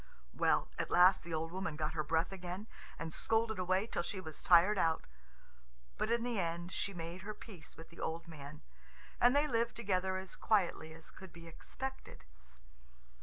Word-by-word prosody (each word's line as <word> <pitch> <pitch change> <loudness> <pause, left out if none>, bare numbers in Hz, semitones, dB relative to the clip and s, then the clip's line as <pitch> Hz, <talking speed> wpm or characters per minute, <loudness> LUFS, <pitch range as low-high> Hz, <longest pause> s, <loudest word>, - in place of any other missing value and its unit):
Well, - - +2
at - - -1
last 180 +2 +6
the 170 - -9
old 165 +1 -2
woman 185 -3 -3
got 155 0 -2
her 155 -1 0
breath 160 +3 +1
again, 185 +1 -5 0.3
and 160 0 -5
scolded 220 -2 +1
away 185 +2 +2
till 225 - -2
she 190 +3 -4
was 160 -4 -8
tired 185 +4 +6
out. 160 -1 +2 0.9
But 215 - +1
in 235 0 +2
the 240 -3 -1
end 170 0 -2
she 200 - -1
made 170 0 -6
her 210 +3 -6
peace 185 -9 -11
with 165 - -11
the 170 - -14
old 165 +1 -3
man, 150 -2 -10 0.6
and 245 +2 +6
they 290 +1 +5
lived 235 -4 0
together 190 -4 0
as 190 -1 -6
quietly 180 -6 +1
as 160 0 -11
could 190 -2 -12
be 170 0 -12
expected. 265 - -7
180 Hz, 180 wpm, -35 LUFS, 165-210 Hz, 0.9 s, last